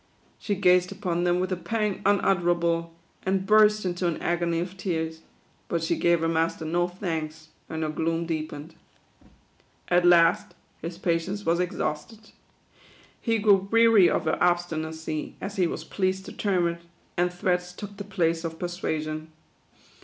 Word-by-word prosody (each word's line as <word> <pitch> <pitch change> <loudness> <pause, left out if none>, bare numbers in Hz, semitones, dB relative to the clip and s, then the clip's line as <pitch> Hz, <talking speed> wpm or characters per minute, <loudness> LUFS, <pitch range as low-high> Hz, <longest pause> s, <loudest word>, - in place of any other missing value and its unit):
She 205 - -1
gazed 180 -1 +3
upon 180 -3 -2
them 175 0 +2
with 185 +1 -1
a - - +1
pang 210 +2 -2
un 200 0 +4
utterable, 170 -2 +1 0.3
and 190 0 0
burst 210 0 +5
into 175 0 -1
an 170 - -2
agony 170 -1 0
of 180 +2 -4
tears; 160 -4 -3 0.5
but 170 -1 -1
she 165 - +1
gave 170 -1 +2
her 165 - +1
master 165 0 0
no 175 +2 +1
thanks, 160 -4 -5 0.2
and 160 0 -3
her 155 - -1
gloom 165 +2 -1
deepened. 155 -1 -5 1.2
At 175 0 +4
last 170 -1 +4 0.3
his 170 +1 -6
patience 180 +3 -1
was 170 +1 +2
exhausted. 180 +5 -3 0.9
He 230 -2 +1
grew 210 -1 +3
THE 195 - +8
QUADROONS. 195 +1 -11
weary 230 -5 +6
of - - 0
her 155 - +1
obstinacy 160 -3 -1
y - - -12
as 200 +1 -6
he 180 -2 +3
was - - -5
pleased 190 0 -1
to - - -9
term 185 -4 +1
it; 170 0 -4 0.3
and 175 0 +1
threats 180 0 -1
took 205 +2 -9
the 205 - -5
place 170 -4 0
of 165 -1 -4
persuasion. 155 -3 -3
175 Hz, 170 wpm, -26 LUFS, 165-190 Hz, 1.2 s, THE